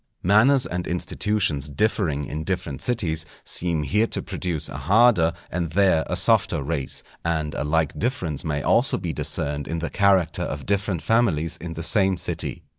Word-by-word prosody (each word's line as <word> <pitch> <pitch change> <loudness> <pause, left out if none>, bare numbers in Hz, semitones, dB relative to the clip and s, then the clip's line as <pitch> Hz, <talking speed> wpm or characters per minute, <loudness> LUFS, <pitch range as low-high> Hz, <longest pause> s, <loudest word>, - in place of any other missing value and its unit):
_ - - -49 0.2
Manners 120 +8 +4
and 90 0 -4
institutions 90 -4 0
differing 80 -3 0
in 75 +2 -5
different 80 -5 -4
cities, 85 -10 0 0.2
seem 85 -3 0
here 105 +10 +1
to - - -2
produce 85 -5 -2
a - - -8
harder 105 -4 +4 0.2
and 85 -2 -2
there 95 -4 +3
a - - -2
softer 70 - +3
race; 70 -2 -3 0.2
and 80 -2 -2
a - - -3
like 80 0 0
difference 90 - -2
may 75 -3 -2
also 120 +3 +2
be 85 -3 -4
discerned 70 +1 -2
in 85 - -3
the 80 0 -4
character 95 -5 +2
of - - -4
different 100 -3 -1
families 95 -9 +1
in 85 +1 -7
the 80 +1 -6
same 95 0 +4
city. - - -3
85 Hz, 175 wpm, -23 LUFS, 80-100 Hz, 0.2 s, Manners